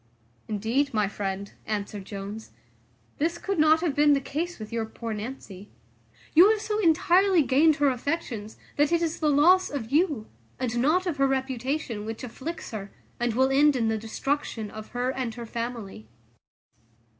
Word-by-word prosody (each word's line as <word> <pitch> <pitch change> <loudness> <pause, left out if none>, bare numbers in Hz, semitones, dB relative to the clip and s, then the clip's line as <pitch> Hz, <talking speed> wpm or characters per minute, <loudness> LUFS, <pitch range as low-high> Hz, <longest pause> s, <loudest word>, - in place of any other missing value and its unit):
"Indeed, 230 +6 0
my 210 -2 +2
friend," 200 0 -4 0.2
answered 205 -2 -4
Jones, 205 +2 -7 0.7
"this 330 +3 0
could 390 -2 -3
not 310 +1 +5
have 335 -5 0
been 295 0 +5
the 280 - +3
case 330 +6 -4
with 215 0 -8
your 230 -1 0
poor 225 0 -6
Nancy. 210 -3 -7 0.6
You 355 +6 +8
have 440 -1 +2
so 425 0 -2
entirely 355 0 +4
gained 290 +4 +4
her 290 0 +2
affections, 245 -5 -3 0.2
that 295 +1 +3
it 340 0 +2
is 325 -1 -2
the 310 - +2
loss 350 +6 +5
of 255 -5 -5
you, 295 - +2 0.3
and 240 -2 -2
not 320 +9 +2
of 340 -5 -2
her 275 0 +3
reputation, 265 -3 -2
which 225 +2 -6
afflicts 260 +7 -6
her, 200 -3 -6 0.3
and 240 -2 0
will 260 +2 +3
end 290 +1 +5
in 230 -3 +1
the 220 - 0
destruction 225 -1 -3
of 215 0 -8
her 245 +1 -2
and 250 -4 -4
her 240 -1 -6
family." 230 - -6
260 Hz, 170 wpm, -26 LUFS, 220-310 Hz, 0.7 s, You